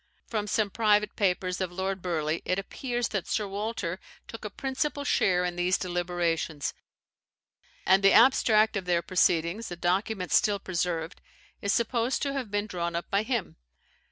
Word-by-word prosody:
From 210 -2 -3
some 210 0 0
private 210 -1 +2
papers 185 -2 0
of 185 -2 -2
Lord 190 +1 -3
Burleigh, 160 -3 -1
it 185 - 0
appears 240 +4 -3
that 195 -4 -3
Sir 210 -2 -1
Walter 200 -3 -3 0.3
took 225 - -9
a 210 - -4
principal 275 +5 -2
share 180 -9 +2
in 175 -1 -2
these 180 +1 +2
deliberations; 175 -4 -2 1.1
and 190 +1 +5
the 195 - +7
abstract 220 -3 +5
of 195 -2 -2
their 175 -1 +1
proceedings, 180 +3 +1
a 175 - -5
document 185 +2 -1
still 205 -1 +3
preserved, 175 -3 -3 0.4
is 200 - 0
supposed 235 +2 +1
to 280 -1 -1
have 265 -5 -3
been 205 0 -1
drawn 170 -4 -3
up 170 - -4
by 200 - +3
him. 230 -3 -3
195 Hz, 160 wpm, -28 LUFS, 175-220 Hz, 1.1 s, the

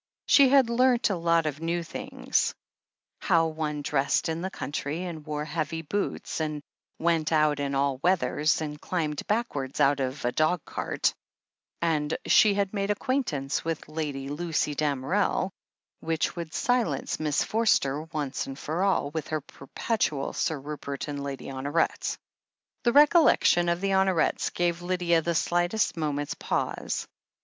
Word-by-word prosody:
She 275 -2 +6
had 265 -3 +5
learnt 245 -2 +3
a - - +1
lot 170 -1 +2
of 150 0 -3
new 170 +1 -1
things 260 +9 -1 0.3
— - - -56
^how 165 -4 +2
one 150 -2 -3
dressed 145 +2 +1
in 160 +1 -2
the 190 - -2
country, 150 0 -4
and 165 -4 -6
wore 150 0 -3
heavy 160 +1 -3
boots, 200 +3 -3
and 150 -2 -3 0.3
went 165 -1 +1
out 150 -2 +3
in 140 -1 -1
all 135 -1 +1
weathers, 160 -3 +2
and 150 -1 -5
climbed 155 -5 -2
backwards 175 - -2
out 140 +1 +4
of 130 0 -3
a 120 - +2
dog 155 +4 +1
cart, - - -1 0.7
and 155 -2 0
she 210 -2 +5
had 200 -1 0
made 200 -1 -1
acquaintance 205 - -1
with 165 -1 -3
Lady 150 -3 -4
Lucy 150 0 -1
Dam 145 -3 -1
erel, 190 +3 +1 0.5
which 160 -2 -1
would 170 -2 -5
silence 235 - 0
Miss 150 -2 +1
Forster, 155 -11 +2
once 155 -4 -4
and 135 0 -7
for 160 +5 -3
all, 190 -7 +1
with 160 -1 -4
her 155 -1 -2
perpetual 145 - -2
"Sir 155 -3 -1
Rupert 140 0 -6
and 145 -1 -4
Lady 140 -1 -5
Honoret." 140 +4 -1 0.7
The 240 - +5
recollection 290 - +5
of 170 +1 0
the 195 0 0
Honorets 190 -3 +2
gave 175 0 0
Lydia 175 -2 +1
the 170 +1 -1
slightest 175 +6 +1
moment's 145 -3 -2
pause. - - -2
160 Hz, 155 wpm, -27 LUFS, 145-185 Hz, 0.7 s, She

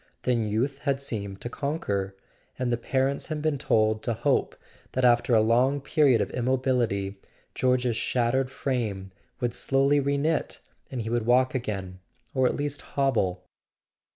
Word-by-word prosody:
Then 120 -3 +1
youth 125 +7 -1
had 140 -2 0
seemed 100 -7 -4
to 120 - -4
conquer, 105 -10 -2 0.4
and 125 -1 -1
the - - +3
parents 135 +3 -1
had 155 -2 -3
been 150 -2 0
told 110 -5 +2
to 115 - -1
hope 135 +4 +1 0.4
that 130 0 +1
after 120 0 +4
a 110 - +6
long 125 +5 +3
period 140 -3 +3
of - - -2
immobility 120 -6 0 0.3
George's 125 -2 +1
shattered 125 +2 +1
frame 110 -8 -3 0.3
would 120 -1 0
slowly 135 +3 +2
re 140 0 0
knit, 155 +2 -1 0.3
and 125 -3 -4
he 110 - -4
would 120 -1 0
walk 130 +1 +4
again 95 -7 -4 0.3
—or 130 -1 +3
at - - -1
least 145 0 -3
hobble. 110 -10 0
125 Hz, 155 wpm, -26 LUFS, 110-135 Hz, 0.4 s, a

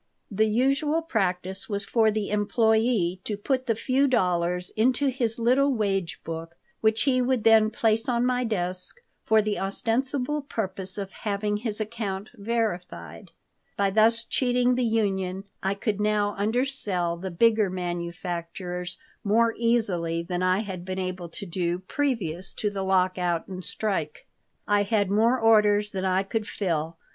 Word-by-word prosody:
The 215 +2 +2
usual 275 +8 +1
practice 190 - -2
was 200 -1 -2
for 220 +2 +3
the 210 -1 -2
employee 215 -3 +2
to 210 - -3
put 260 +4 -1
the 225 - +2
few 260 +5 +1
dollars 180 -6 +1
into 255 +5 +2
his 240 -4 -1
little 255 +4 +3
wage 195 -5 -1
book, 165 0 -6 0.2
which 220 0 +3
he 255 -2 +2
would 250 -2 +1
then 220 -1 +6
place 225 +1 +1
on 240 0 +1
my 250 0 +1
desk 185 - -3 0.2
for 220 -1 +4
the 210 -1 -1
ostensible 255 +8 0
purpose 190 -7 -2
of 195 -1 -5
having 210 0 -2
his 215 -1 -3
account 215 -3 -4
verified 200 - -3 0.5
By 200 -1 +2
thus 225 +3 +4
cheating 250 0 +2
the 250 0 0
union 195 -4 0 0.2
I 195 +1 0
could 210 0 -2
now 210 -1 +1
undersell 205 -6 0
the 185 +3 -5
bigger 215 +3 +3
manufacturers 175 0 -4 0.3
more 230 +2 +3
easily 185 -8 0
than 175 +1 -3
I 185 +2 +2
had 190 -5 -6
been 185 +1 -5
able 185 -2 -4
to 185 - -6
do 175 -1 -1
previous 190 - -2
to 210 - -1
the 195 -1 -4
lockout 185 -3 +1
and 185 -1 -7
strike. 165 -9 -2 0.4
I 205 0 +3
had 205 -1 +1
more 230 +5 +3
orders 210 -2 +4
than 190 -1 -3
I 190 +1 +2
could 215 +2 -3
fill. 165 -4 -2
205 Hz, 155 wpm, -26 LUFS, 185-230 Hz, 0.5 s, then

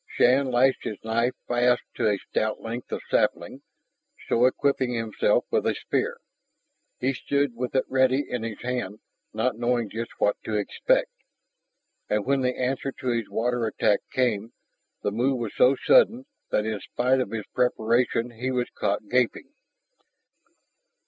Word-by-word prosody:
Shann 130 +2 +3
lashed 130 +2 +3
his 105 - -4
knife 115 +3 0
fast 120 0 +2
to 115 -3 +1
a 100 - +1
stout 110 +2 -2
length 115 +2 -6
of - - -4
sapling, - - 0 0.7
so 120 +2 +3
equipping 130 -1 +1
himself 115 -2 +1
with - - +1
a - - +1
spear. - - -2 0.8
He 130 +2 0
stood 140 0 -1
with 125 +2 -4
it 130 - +2
ready 130 +1 +2
in 125 - -3
his 115 -2 -5
hand, 120 -5 -3 0.3
not 110 +2 -1
knowing 120 -3 0
just 115 +2 -4
what 105 - +2
to 110 - -2
expect. - - +1 1.0
And 105 -1 0
when 140 0 +2
the 125 0 0
answer 130 +2 -1
to 130 - -5
his 115 -3 -1
water 120 0 0
attack 105 -1 +2
came, 115 -3 0 0.5
the 105 - 0
move 125 +5 +1
was 115 -4 -4
so 130 +2 +5
sudden 370 - +4 0.2
that 105 - +1
in 110 -2 -2
spite 130 +5 0
of 125 - -1
his 110 -1 -4
preparation 120 0 +1
he 120 +3 -4
was 125 -1 -1
caught 100 +1 -1
gaping. 125 0 0
120 Hz, 155 wpm, -26 LUFS, 110-130 Hz, 1.0 s, so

